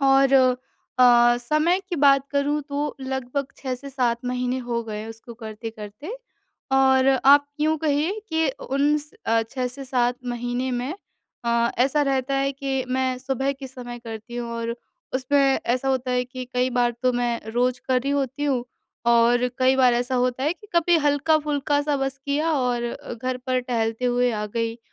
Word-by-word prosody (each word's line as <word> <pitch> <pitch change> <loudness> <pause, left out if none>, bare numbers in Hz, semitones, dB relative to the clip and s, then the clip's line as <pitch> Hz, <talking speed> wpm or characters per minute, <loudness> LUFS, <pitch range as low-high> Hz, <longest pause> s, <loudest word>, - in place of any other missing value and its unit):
और 270 0 +5 0.7
अ, 240 -1 +6
समय 305 +8 +1
की 355 - -2
बात 275 -1 +4
करूँ 285 +1 +1
तो 290 +1 -2
लगभग 265 +1 -3
6 260 -2 -3
से 275 +2 -9
7 245 -3 0
महीने 250 +1 -1
हो 240 -2 -2
गए 215 -1 -5
उसको 225 +1 -10
करते-करते। 220 - -8 0.6
और 265 0 +4 0.2
आप 285 +1 +7
यूँ 315 +1 +2
कहिए 300 +4 +1 0.2
कि 320 0 +1
अ, 270 +2 -6
उन 285 +3 +2
स 295 +1 -11 0.2
अ, 225 0 +3
6 255 -1 -2
से 270 +2 -8
7 250 -2 +1
महीने 245 +1 -2
में 250 +4 -2 0.5
अ, 235 0 +2
ऐसा 275 +4 +3
रहता 275 -1 0
है 275 0 +1
के 270 -2 -2
मैं 260 -1 0
सुबह 270 +1 -1
के 270 0 -9
समय 245 -2 -8
करती 230 0 -8
हूँ 240 -1 -4
और 230 0 -2 0.4
उसमें 260 +2 +1 0.3
ऐसा 255 +3 0
होता 260 -1 0
है 250 0 +1
कि 255 0 -7
कई 250 +1 +2
बार 245 -1 +2
तो 255 0 +3
मैं 240 -1 -1
रोज़ 250 +1 +1
कर 255 -1 +3
रही 275 - -1
होती 280 +1 -1
हूँ 260 -4 0 0.4
और 235 +1 +4
कई 260 +1 +4
बार 255 -2 +5
ऐसा 245 +2 -1
होता 255 +1 0
है 305 - +2
कि 390 +4 -17
कभी 340 0 +4
हल्क़ा-फ़ुल्का-सा 290 -1 +1
बस 270 0 -2
किया 300 +3 0
और 250 -4 0
अ, 235 - -6
घर 255 +2 -3
पर 255 0 +1
टहलते 230 -1 -2
हुए 245 0 +2
आ 210 -1 -2
गई। 230 +2 -3
255 Hz, 180 wpm, -24 LUFS, 245-280 Hz, 0.7 s, आप